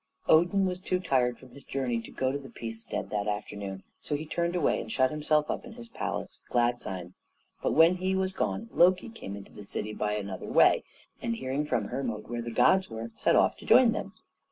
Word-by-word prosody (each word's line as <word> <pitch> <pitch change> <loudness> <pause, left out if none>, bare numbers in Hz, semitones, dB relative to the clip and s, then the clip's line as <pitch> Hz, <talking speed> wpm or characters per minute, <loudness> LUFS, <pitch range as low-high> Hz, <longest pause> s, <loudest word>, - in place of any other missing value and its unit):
Odin 175 +5 +5
was 180 -1 -2
too 185 0 -1
tired 130 -8 +1
from 130 -2 -16
his 140 - -13
journey 125 -4 -2
to - - -11
go 130 0 -1
to 140 - -3
the 135 - -11
Peacestead 115 -1 -5
that 105 0 -1
afternoon; 100 -2 -4 0.2
so 150 - -3
he 150 +2 -4
turned 170 +3 -1
away 175 - +2
and 110 - -7
shut 130 +2 +2
himself 150 0 +1
up - - -4
in 245 - -10
his 235 0 -10
palace - - -4
of - - -31
Gladsheim. 120 -7 0 0.5
But - - 0
when 165 +3 +6
he 190 +1 0
was 190 0 0
gone, 225 - -2
Loki 180 +5 +4
came 160 - -7
into 100 -1 -11
the 105 - -10
city 105 +1 -4
by 105 0 -1
another 100 -3 -5
way, - - +5 0.4
and 115 - -1
hearing 130 +4 -2
from 120 -6 0
Hermod 115 -6 -3
where 120 0 -3
the 120 - -5
gods 190 +10 +4
were, 115 0 -6
set - - +2
off - - +4
to - - -12
join - - +7
them. - - -4
130 Hz, 220 wpm, -29 LUFS, 110-175 Hz, 0.5 s, join